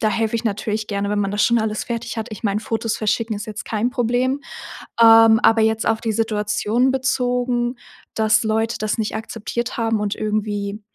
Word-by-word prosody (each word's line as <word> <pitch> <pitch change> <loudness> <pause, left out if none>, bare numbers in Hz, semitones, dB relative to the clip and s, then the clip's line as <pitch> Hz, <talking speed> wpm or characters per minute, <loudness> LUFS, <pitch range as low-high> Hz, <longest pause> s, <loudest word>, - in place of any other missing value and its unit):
Da 215 - +2
helfe 225 0 -1
ich 230 - -5
natürlich 215 0 -2
gerne, 200 0 -2
wenn 205 0 0
man 195 -1 -1
das 205 +1 0
schon 235 0 +3
alles 215 -1 -2
fertig 235 -1 -4
hat. 220 - -3
Ich 210 - -8
meine, 205 -1 0
Fotos 225 0 -2
verschicken 220 +1 -1
ist 205 - -6
jetzt 215 -1 -6
kein 220 +2 -1
Problem. 250 +2 0 0.6
Ähm, 225 -1 +8
aber 225 0 +5
jetzt 220 0 +1
auf 225 0 +1
die 225 -1 -1
Situation 215 +3 0
bezogen, 250 -2 0 0.4
dass 220 0 +3
Leute 220 +1 0
das 215 +1 -2
nicht 215 -1 -2
akzeptiert 225 +2 -4
haben 225 -2 0
und 210 -1 -1
irgendwie, 210 -1 -2
220 Hz, 190 wpm, -21 LUFS, 210-235 Hz, 0.6 s, Ähm